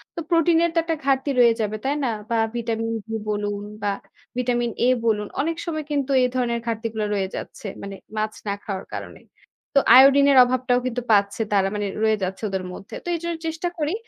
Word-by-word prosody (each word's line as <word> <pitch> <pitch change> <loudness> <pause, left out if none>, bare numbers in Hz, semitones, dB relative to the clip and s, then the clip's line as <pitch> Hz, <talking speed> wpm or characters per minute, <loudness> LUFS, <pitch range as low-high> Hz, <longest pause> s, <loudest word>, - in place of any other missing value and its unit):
তো - - -4
প্রোটিন 335 -1 +4
এর 340 - +3
তো - - +4
একটা 330 0 -1
ঘাটতি 270 +1 +1
রয়ে 235 -1 +6
যাবে। 215 0 -1
তাই 280 +2 +1
না? 255 - +1 0.2
বা 230 - +1 0.2
ভিটামিন-ডি 225 -1 -3
বলুন 205 -1 -2 0.2
বা 205 - 0 0.5
ভিটামিন-এ 240 -1 0 0.2
বলুন। 210 -2 +1
অনেক 330 +3 -1
সময় 310 -3 -3
কিন্তু 280 -2 0
এ - - +5
ধরনের 240 -2 0
ঘাটতি 230 0 -2
গুলা 215 -1 -1
রয়ে 195 -2 0
যাচ্ছে। - - -7
মানে 200 0 -6 0.2
মাছ 215 0 -1
না 200 - +1
খাওয়ার 195 -2 -5
কারণে। - - -8 0.5
তো 275 - +7 0.2
আয়োডিনের 275 +1 +7
অভাবটাও 250 0 +1
কিন্তু 245 0 -2
পাচ্ছে 200 +1 +3
তারা 195 -1 +3
মানে 205 -1 -1 0.2
রয়ে 220 -1 +3
যাচ্ছে 190 +3 -4
ওদের 190 -1 -2
মধ্যে। 195 - -9
তো - - -12
এইজন্য 340 0 -3
চেষ্টা 320 +2 -2
করি। 305 +1 -1
235 Hz, 190 wpm, -23 LUFS, 210-280 Hz, 0.5 s, তো